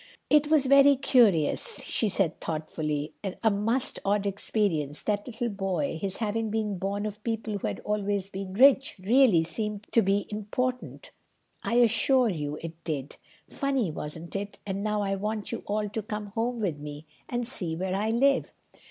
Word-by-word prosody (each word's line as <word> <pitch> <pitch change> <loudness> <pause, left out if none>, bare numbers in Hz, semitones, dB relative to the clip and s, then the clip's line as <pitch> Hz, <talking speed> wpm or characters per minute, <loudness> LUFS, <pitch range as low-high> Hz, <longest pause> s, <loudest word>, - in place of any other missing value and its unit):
"It 300 0 +5
was 305 -3 +4
very 275 +1 +7
curious," 245 - +3
she 220 - 0
said 185 -4 +1
thoughtfully, 155 -2 -3 0.3
"a 220 - +5
most 225 +6 0
odd 205 0 +1
experience, 190 -7 0
that 205 +1 -1
little 235 0 -3
boy... 190 -7 -2
his 195 -1 -2
having 220 0 -1
been 210 -3 -2
born 200 +2 -2
of 210 0 -6
people 225 -2 -2
who - - -2
had - - -4
always 200 -2 -1
been 190 0 -6
rich, 275 +4 +5
really 215 -3 +4
seemed 210 +5 -3
to 230 - +5
me 200 0 +1
to - - -21
be - - -2
important. 250 +5 -3 0.5
I 235 - -1
assure 240 +2 +4
you 150 -5 -3
it 165 0 -8
did. 145 -4 -4 0.3
Funny, 270 - -1
wasn't 160 +4 -7
it? 200 +1 -4
And 195 0 -3
now 210 -1 0
I 195 -1 -1
want 210 +2 -3
you - - -4
all 210 +1 -1
to 220 +2 -3
come 210 -1 -6
home 235 +2 -1
with 170 -8 -1
me, 145 +1 -8 0.2
and 240 -1 -2
see 180 -10 -2
where 185 +2 -2
I 205 +3 0
live." 265 +4 +2
205 Hz, 180 wpm, -27 LUFS, 185-230 Hz, 0.5 s, very